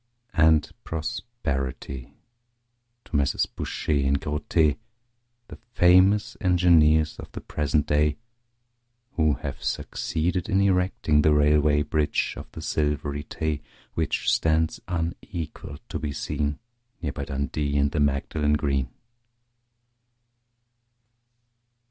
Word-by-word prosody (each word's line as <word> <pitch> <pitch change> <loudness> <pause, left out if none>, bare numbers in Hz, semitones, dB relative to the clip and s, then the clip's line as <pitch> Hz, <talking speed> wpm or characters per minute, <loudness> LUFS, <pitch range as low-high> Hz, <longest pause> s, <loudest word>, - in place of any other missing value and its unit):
And 80 -1 +4
prosperity 70 - -4 0.9
to - - -7
Messrs 70 -1 +2
Bouche - - -6
and 70 -2 +2
Grothe, 75 0 +1 0.7
The - - -10 0.2
famous 95 +6 +5
engineers 85 -4 +4
of - - -9
the - - -5
present 75 0 0
day, 75 0 +2 0.9
Who 80 -3 +2
have 70 -1 -6
succeeded 90 +4 -2
in 95 -2 +3
erecting 90 -6 +2
The 75 0 +4
Railway 75 0 +4
Bridge 75 0 0
of - - -9
the - - -8
Silvery 75 -1 -1
Tay, 75 -2 -3 0.3
Which - - -1
stands 80 0 +1
unequalled 85 -3 -5
to - - -3
be 75 -2 -3
seen 75 0 -2 0.5
Near 75 - -1
by 70 - -5
Dundee 70 +1 -2
and 70 0 +2
the 80 - -1
Magdalen 75 +1 +1
Green. 70 -4 0
75 Hz, 105 wpm, -25 LUFS, 70-80 Hz, 0.9 s, famous